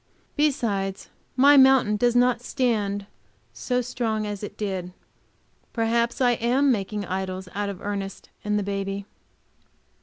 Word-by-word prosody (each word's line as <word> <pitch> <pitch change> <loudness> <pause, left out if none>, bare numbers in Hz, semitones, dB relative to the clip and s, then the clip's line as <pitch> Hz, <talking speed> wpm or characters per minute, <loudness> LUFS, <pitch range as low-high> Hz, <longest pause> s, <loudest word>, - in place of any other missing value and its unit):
Besides, 210 -10 -1 0.3
my 280 +3 +6
mountain 265 -5 +6
does 240 +3 +2
not 245 -1 +3
stand 215 -7 -1 0.5
so 250 - -1
strong 225 -3 -2
as 205 -1 -5
it 205 - -7
did. 190 -4 -4 0.8
Perhaps 235 +1 0
I 245 -1 +5
am 250 +4 +2
making 205 -2 -2
idols 185 0 -4
out 205 0 -2
of 195 -3 -6
Ernest 200 -1 -5
and 210 0 0
the 205 - 0
baby. 195 0 -3
210 Hz, 130 wpm, -25 LUFS, 195-245 Hz, 0.8 s, my